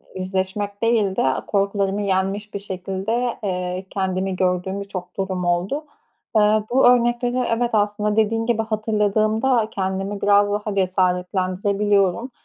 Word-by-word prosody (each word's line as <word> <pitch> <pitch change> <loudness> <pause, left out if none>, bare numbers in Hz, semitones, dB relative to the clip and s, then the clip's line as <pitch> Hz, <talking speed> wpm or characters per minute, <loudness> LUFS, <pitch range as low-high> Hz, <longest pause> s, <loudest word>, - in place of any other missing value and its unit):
yüzleşmek 190 +2 -3
değil 225 -4 +2
de - - +1
a 130 - -1
korkularımı 200 0 0
yenmiş 200 +1 -1
bir 200 - -3
şekilde, 195 +5 -3
eee, 180 -1 -3
kendimi 190 -1 -2
gördüğüm 185 +1 -1
birçok 185 -2 -7
durum 190 -2 -2
oldu. 180 - -1 0.5
Eee, 215 0 +4
bu 260 0 +5
örnekleri 240 0 +3
evet, 235 +1 +1
aslında 210 0 +1
dediğin 225 +1 +1
gibi 230 -1 +1
hatırladığımda 215 +2 +1
kendimi 195 +1 -3
biraz 205 0 +4
daha 210 0 -2
cesaretlendirebiliyorum 190 +3 +1
200 Hz, 125 wpm, -22 LUFS, 190-215 Hz, 0.5 s, bu